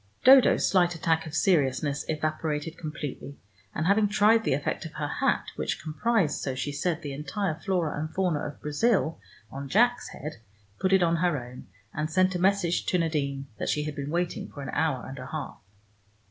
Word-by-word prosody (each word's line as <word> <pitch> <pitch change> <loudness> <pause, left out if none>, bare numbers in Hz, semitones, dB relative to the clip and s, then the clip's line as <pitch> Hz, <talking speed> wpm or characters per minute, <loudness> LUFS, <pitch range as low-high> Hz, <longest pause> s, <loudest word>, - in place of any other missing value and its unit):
Dodo's 260 -1 +7
slight 175 -2 +3
attack 160 0 0
of 155 - -6
seriousness 145 -4 +1
evaporated 155 0 -2
completely, 150 -3 -6 0.4
and 155 - -1
having 205 +3 +4
tried 215 +2 +4
the 135 - +2
effect 145 - -3
of 160 - -8
her 145 - -3
hat, 145 - 0
which - - -2
comprised, 165 0 0
so 135 - -2
she 140 +2 -3
said, 160 +3 -2
the 145 -2 -4
entire 160 +6 -2
flora 165 -2 -1
and 155 +1 -4
fauna 180 -3 0
of 145 0 -6
Brazil, 160 +3 +1 0.3
on 135 0 -6
Jack's 245 - +3
head, 150 0 -7 0.4
put 190 - +1
it 190 -1 +5
on 170 0 +2
her 175 -2 +1
own, 125 -3 -9 0.3
and 155 0 -2
sent 185 +3 +3
a 180 - -2
message 185 -2 +1
to 180 - +2
Nadine 140 -5 -1
that - - -2
she 150 - 0
had 150 -1 -4
been 140 0 -4
waiting 175 +2 -2
an 135 -2 -5
hour 140 -5 0
and 135 0 -8
a 125 - -7
half. 150 -1 -6
160 Hz, 190 wpm, -27 LUFS, 145-185 Hz, 0.4 s, Dodo's